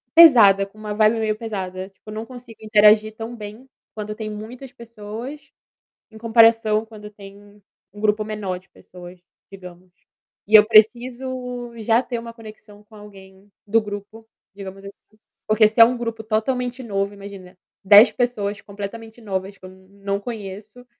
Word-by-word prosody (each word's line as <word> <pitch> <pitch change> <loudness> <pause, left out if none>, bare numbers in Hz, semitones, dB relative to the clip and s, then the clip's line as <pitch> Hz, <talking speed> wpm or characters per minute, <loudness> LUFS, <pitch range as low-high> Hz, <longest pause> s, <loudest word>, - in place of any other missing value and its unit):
pesada, 220 -12 +7
com 200 +2 -21
uma 215 -1 -6
vibe 215 +2 +2
meio 215 -1 -1
pesada, 190 -4 -6
tipo 195 +2 -18
eu - - -7
não 220 +1 -6
consigo 240 -2 -13
interagir 215 0 +4
tão 225 +2 -7
bem, 215 +3 -10 0.3
quando 210 0 -5
tem 215 -1 -6
muitas 235 +5 -9
pessoas, 235 +4 -10 0.6
em 220 - -14
comparação 225 -1 +3
quando 210 -1 -12
tem 205 0 -16 0.3
um 205 - -13
grupo 215 0 +1
menor 210 -4 -5
de 185 - -26
pessoas, 180 0 -14 0.3
digamos. 180 -1 -13 0.6
E 210 - -4
eu 210 0 +6
preciso 245 +2 +1
já 225 +1 +2
ter 240 -3 -5
um 230 0 -9
conexão 215 -2 -15
com 215 +1 -21
alguém 195 -1 -16 0.2
do 225 +2 +2
grupo, 210 +2 -9 0.3
digamos 195 0 -10
assim. 200 - -8 0.6
Porque 215 0 +4
se 220 +2 -2
é - - +12
um 245 +2 0
grupo 230 -2 -5
totalmente 250 +3 -2
novo, 200 -3 -3
imagina, 195 -2 -12 0.3
10 205 +4 +8
pessoas 210 -5 -2
completamente 220 +3 -9
novas 195 -2 -5
que 185 - -20
eu 185 - -9
não 200 +1 -6
conheço, 210 +2 -9
215 Hz, 160 wpm, -21 LUFS, 200-230 Hz, 0.6 s, é